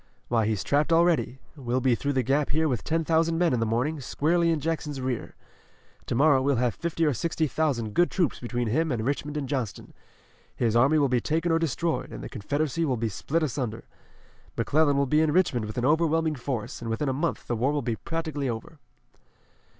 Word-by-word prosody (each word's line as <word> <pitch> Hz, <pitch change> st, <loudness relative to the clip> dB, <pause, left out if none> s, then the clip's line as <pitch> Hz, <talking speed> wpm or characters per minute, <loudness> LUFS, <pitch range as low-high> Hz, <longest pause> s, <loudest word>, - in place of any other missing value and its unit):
Why, 115 Hz, -3 st, +2 dB
he's 110 Hz, -3 st, -1 dB
trapped 150 Hz, +3 st, +1 dB
already. 165 Hz, -5 st, +3 dB, 0.2 s
We'll 130 Hz, -3 st, -1 dB
be 130 Hz, -1 st, +2 dB
through 140 Hz, +4 st, -1 dB
the 130 Hz, -1 st, +1 dB
Gap 140 Hz, +4 st, +1 dB
here 160 Hz, +2 st, +1 dB
with 125 Hz, -8 st, -1 dB
ten 165 Hz, +1 st, 0 dB
thousand 165 Hz, 0 st, +2 dB
men 170 Hz, -3 st, +2 dB
in 125 Hz, -, +1 dB
the 115 Hz, -, 0 dB
morning, 130 Hz, +8 st, 0 dB
squarely 165 Hz, +6 st, +1 dB
in 165 Hz, -2 st, +1 dB
Jackson's 150 Hz, -2 st, -3 dB
rear. 130 Hz, -2 st, -3 dB, 0.7 s
To -, -, -1 dB
morrow 140 Hz, 0 st, +4 dB
we'll 140 Hz, +1 st, +2 dB
have 120 Hz, -1 st, +1 dB
fifty 165 Hz, -1 st, -1 dB
or 150 Hz, -, +2 dB
sixty 160 Hz, +6 st, -1 dB
thousand 130 Hz, -7 st, -1 dB
good 175 Hz, +7 st, +3 dB
troops 175 Hz, -6 st, 0 dB
between 120 Hz, -1 st, -2 dB
him 160 Hz, +7 st, +1 dB
and 115 Hz, -3 st, -2 dB
Richmond 145 Hz, +2 st, -2 dB
and 140 Hz, -3 st, -3 dB
Johnston. 130 Hz, -6 st, -4 dB, 0.6 s
His 115 Hz, -2 st, 0 dB
army 135 Hz, +6 st, +4 dB
will 145 Hz, -2 st, +3 dB
be 125 Hz, -2 st, +1 dB
taken 165 Hz, +2 st, 0 dB
or 165 Hz, -, +3 dB
destroyed, 165 Hz, +1 st, -1 dB
and -, -, -7 dB
the -, -, -6 dB
Confederacy 145 Hz, +8 st, -2 dB
will 135 Hz, -6 st, 0 dB
be 115 Hz, 0 st, -1 dB
split 155 Hz, +11 st, -1 dB
asunder. 125 Hz, -6 st, -3 dB, 0.7 s
McClellan 145 Hz, +4 st, +2 dB
will 140 Hz, -, +3 dB
be 150 Hz, +4 st, +3 dB
in 160 Hz, -1 st, +2 dB
Richmond 145 Hz, -10 st, +2 dB
with 105 Hz, -, -7 dB
an 120 Hz, -, 0 dB
overwhelming 160 Hz, +1 st, +2 dB
force, 125 Hz, -5 st, -4 dB
and 115 Hz, -, -5 dB
within 115 Hz, +6 st, -1 dB
a 135 Hz, -, +1 dB
month 160 Hz, +5 st, -2 dB
the 120 Hz, -, -2 dB
war 125 Hz, +5 st, +1 dB
will 150 Hz, -2 st, -1 dB
be 115 Hz, -1 st, -1 dB
practically 155 Hz, -5 st, -3 dB
over." 115 Hz, -2 st, -6 dB
140 Hz, 210 wpm, -26 LUFS, 120-160 Hz, 0.7 s, morrow